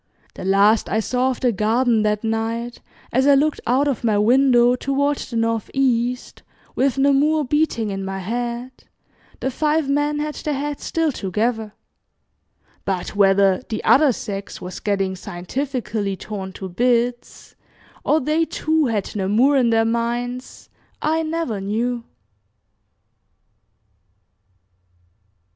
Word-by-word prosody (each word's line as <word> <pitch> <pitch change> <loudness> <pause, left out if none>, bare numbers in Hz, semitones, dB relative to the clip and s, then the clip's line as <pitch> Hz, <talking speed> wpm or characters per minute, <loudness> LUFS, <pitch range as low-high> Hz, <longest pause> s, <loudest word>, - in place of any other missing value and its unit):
The - - -9
last 200 +3 +3
I 220 - +1
saw 250 +3 0
of 255 - -4
the 250 - +3
garden 225 +2 +2
that 210 0 0
night, 225 +2 -2 0.3
as 260 +3 +3
I 285 - +7
looked 300 +2 +1
out 265 +4 +2
of 275 -4 -2
my 220 -3 +2
window 245 +2 +4
toward 280 +2 0
the 240 - -7
northeast, 235 +2 -1 0.3
with 275 0 +1
"Namur" 285 +3 +3
beating 270 -6 0
in 195 0 -4
my 195 0 -4
head, 240 +5 -3 0.7
the 265 - -1
five 305 +2 0
men 290 +1 +1
had 300 0 -2
their 300 -1 -3
heads 290 +1 -4
still 325 -2 0
together, 220 0 -2 1.1
but 190 0 -3
whether 195 -1 +4
"the 220 - -3
other 290 -1 +5
sex" 200 -4 -6
was 180 0 -7
getting 195 -2 -1
scientifically 205 +2 -4
torn 195 -2 -6
to 190 - -7
bits, 240 +5 -1 0.5
or 310 - +3
they, 310 +4 +1
too, 315 -2 0
had 215 -4 -2
Namur 215 +8 +3
in 250 -3 +3
their 225 0 +3
minds 240 +2 -3 0.3
I 320 +1 +1
never 315 -10 -2
knew. 230 +4 -2
240 Hz, 130 wpm, -21 LUFS, 210-275 Hz, 1.1 s, I